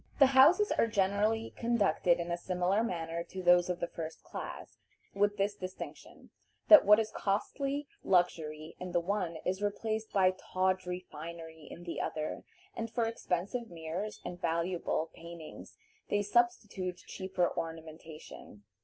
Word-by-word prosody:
The 275 - +8
houses 340 +11 +6
are - - +3
generally 210 +2 +1
conducted 210 -7 +2
in 170 0 -3
a - - +1
similar 180 +3 0
manner 170 -6 -2
to 190 -1 -7
those 175 0 +5
of 180 -1 -1
the 175 - -1
first 160 -1 -7
class, - - -8 0.3
with 205 +1 +1
this 200 +1 +1
distinction, 185 -2 -9 0.4
that 315 - +10
what 210 +1 +8
is 220 -1 -1
costly 275 +8 -1 0.2
luxury 160 -4 +1
in 180 -1 -6
the 175 - +4
one 180 -2 -2
is 190 +2 -1
replaced 220 +1 -2
by 185 -2 +4
tawdry 185 -1 -1
finery 160 0 -9
in 175 - -10
the 170 - -4
other, 155 -1 -3 0.3
and 230 0 -3
for 230 0 0
expensive 225 +1 -2
mirrors 170 +5 -5
and 175 0 -6
valuable 170 -1 -1
paintings 170 -2 -10 0.3
they 205 0 +1
substitute 205 -5 0
cheaper 190 -2 -1
ornamentation. 160 - -8
185 Hz, 145 wpm, -32 LUFS, 170-210 Hz, 0.4 s, that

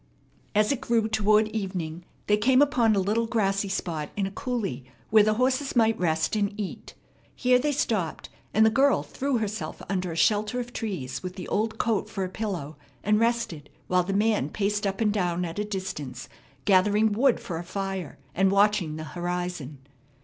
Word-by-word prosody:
As 210 +3 +4
it 275 -2 -1
grew 230 -4 +1
toward 215 0 +3
evening, 180 -6 -4 0.2
they 210 - +4
came 255 +5 +3
upon 245 -6 +4
a - - +2
little 215 +4 +1
grassy 195 -3 0
spot 160 -5 -3
in 200 - +1
a 195 - -4
coulee 205 - -3 0.3
where 215 0 +7
the 215 +1 +3
horses 260 +4 0
might 225 -2 +3
rest 160 +1 +1
and 205 0 -1
eat. 200 -3 -6 0.4
Here 250 0 +3
they 295 +3 +1
stopped, 215 - -1 0.2
and 220 +1 +5
the 220 - +5
girl 275 +4 +3
threw 275 -1 -1
herself 215 -1 -4
under 185 -3 -2
a - - -5
shelter 215 +6 +2
of 245 0 -6
trees, 145 - -4
with 180 0 -6
the 185 - -7
old 220 +2 0
coat 225 -4 0
for 195 - -3
a 185 - -3
pillow, 180 -8 -4 0.3
and 210 +1 +3
rested, 230 -11 -1 0.2
while 180 0 +2
the 180 +2 -3
man 205 -7 +2
paced 205 +3 -1
up 195 +2 -3
and 210 -2 +2
down 180 -3 0
at 170 +3 -5
a - - +1
distance, 150 - -5 0.4
gathering 205 +3 +4
wood 240 +4 +3
for 165 -3 -5
a - - -5
fire, 190 -3 -4 0.2
and 195 +1 +3
watching 200 -5 +2
the 155 - -5
horizon. 175 -4 -4
205 Hz, 185 wpm, -26 LUFS, 180-220 Hz, 0.4 s, where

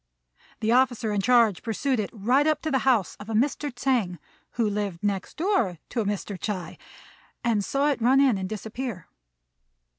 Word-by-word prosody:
The 220 - +1
officer 245 -3 +2
in 205 -1 0
charge 230 -4 +4
pursued 250 +3 -1
it 205 - -2
right 250 +7 +2
up 310 -1 +1
to 315 - -1
the 265 - +2
house 220 -8 +2
of 205 - -10
a 220 - -2
Mr. 285 +4 0
Tsêng, 245 -8 0 0.4
who 230 -2 +1
lived 205 -4 -3
next 200 -2 -2
door 310 - +1
to 230 -4 -1
Mr. 200 -1 -3
Ts'ui, 185 -4 -4 0.6
and 225 -4 +1
saw 280 +7 +1
it 265 - -3
run 255 +4 +5
in 270 -5 +4
and 190 -1 -4
disappear. 220 -2 -5
225 Hz, 175 wpm, -26 LUFS, 205-265 Hz, 0.6 s, run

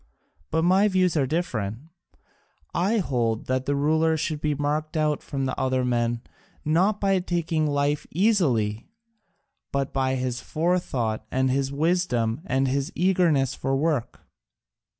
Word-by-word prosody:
But 160 +1 +1
my 190 +4 +4
views 185 -3 +2
are 140 -4 +2
different: 120 - -2 1.0
I 195 +6 +1
hold 120 - 0
that 130 0 -1
the 145 - +1
ruler 160 +3 +2
should 155 -1 -2
be 150 -1 0
marked 150 +3 -2
out 150 -1 +1
from 135 -1 -3
other 130 -1 +1
men, 120 -1 0 0.4
not 185 +7 +2
by 195 -1 +2
taking 165 -3 -1
life 145 0 0
easily, 140 - +1 0.8
but 140 -1 -2
by 130 -1 +1
his 125 -1 -2
forethought 135 -10 -1
and 130 0 +1
his 135 0 0
wisdom 140 -6 0
and 135 +1 +1
his 135 +1 -1
eagerness 170 -7 +2
for 135 0 -1
work." 145 -3 -1
145 Hz, 135 wpm, -25 LUFS, 130-170 Hz, 1.0 s, my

